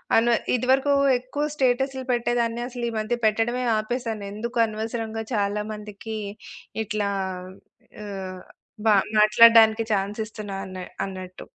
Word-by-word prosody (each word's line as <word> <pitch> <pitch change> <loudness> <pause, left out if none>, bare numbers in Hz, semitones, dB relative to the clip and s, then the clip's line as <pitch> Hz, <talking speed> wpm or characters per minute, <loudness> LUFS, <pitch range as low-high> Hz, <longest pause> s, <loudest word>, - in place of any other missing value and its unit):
అనవ 235 +1 +4 0.2
ఇది 250 - -1
వరకు 270 +2 +3 0.3
ఎక్కువ 255 +4 -4
స్టేటసులు 265 0 0
పెట్టేదాన్ని. 240 -1 0
అసలీ 240 -2 -3
మధ్య 215 +3 -1
పెట్టడమే 225 +4 +1
ఆపేసాను. 225 -1 -3
ఎందుకు 235 +3 -5
అనవసరంగా 225 0 -4
చాలా 205 0 0
మందికి 210 +1 -7 0.7
ఇట్లా 210 -1 -2 0.9
ఆహ్, 190 -2 -6 0.5
బ - - +3 0.3
మాట్లాడడానికి 225 +1 +7
ఛాన్స్ 200 +2 -1
ఇస్తున్నా 210 -2 -7
అన 185 - -8 0.3
అన్నట్టు. 185 -1 -8
225 Hz, 115 wpm, -24 LUFS, 210-240 Hz, 0.9 s, మాట్లాడడానికి